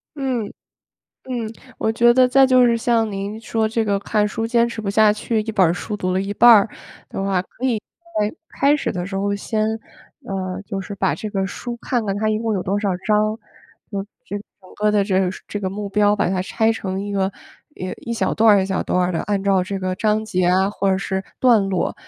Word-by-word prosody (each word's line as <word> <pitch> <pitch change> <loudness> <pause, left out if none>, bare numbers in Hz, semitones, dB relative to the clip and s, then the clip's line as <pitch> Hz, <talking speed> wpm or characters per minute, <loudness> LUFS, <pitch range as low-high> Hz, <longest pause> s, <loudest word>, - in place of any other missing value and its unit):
嗯， 260 -6 -1 0.8
嗯， 235 -4 -4 0.3
我 220 - +1
觉 235 +2 +5
得 255 0 +5
再 270 +1 +6
就 255 -1 +5
是 235 -1 +3
像 230 -1 +1
您 200 +2 -5
说 225 -1 -1
这 225 0 0
个 200 -2 +1
看 210 +1 +1
书 225 +2 -2
坚 235 0 +2
持 235 -1 -5
不 210 - -4
下 215 +1 +5
去 215 +1 -1
1 220 +1 -3
本 185 -6 +4
书 210 +4 -4
读 185 -2 -1
了 185 - +1
一 195 +1 -3
半 240 +4 +6
儿 215 -2 +7 0.4
的 - - -4
话， 195 -2 +1
可 235 +6 -10
以 245 -4 +2 0.4
在 210 0 0 0.3
开 285 +1 +5
始 - - -2
的 175 -1 -3
时 195 0 -5
候 200 +1 0
先 215 +1 -1 0.6
呃， 185 -2 -3
就 200 -1 -5
是 195 +1 -7
把 165 -7 0
这 215 +7 -5
个 195 -1 -1
书 240 +5 -6
看 240 -3 -1
看 195 0 -1
它 215 +1 0
一 215 0 +1
共 225 -1 -1
有 190 - -1
多 195 +2 -1
少 205 -1 0 0.2
章， 215 +1 +2 0.5
就 200 -2 -3 0.2
这 205 - -5
个 205 - -12 0.2
整 185 - -17
个 210 0 +2
的 210 -1 +3
这 190 -2 +1
个 185 -1 +1 0.2
这 205 - -3
个 190 - -1
目 205 +1 -5
标 205 +1 +3
把 205 - +1
它 185 0 0
拆 220 +4 +1
成 190 -3 -4
一 205 - -5
个， 195 -1 +1 0.5
呃， 185 0 -4
一 235 - -2
小 - - 0
段 220 -2 +5
儿 195 - +3
一 - - -2
小 190 -1 -1
段 180 - 0
儿 - - -2
的， 165 - -1
按 200 -1 -1
照 195 -2 +3
这 195 +1 -4
个 185 -1 -2
章 215 +2 +1
节 185 -4 0
啊， 190 +2 +3
或 200 -1 -1
者 190 - +2
是 190 0 -2 0.2
段 240 -4 +5
落， 185 -2 -1
210 Hz, 255 characters per minute, -21 LUFS, 195-225 Hz, 0.8 s, 儿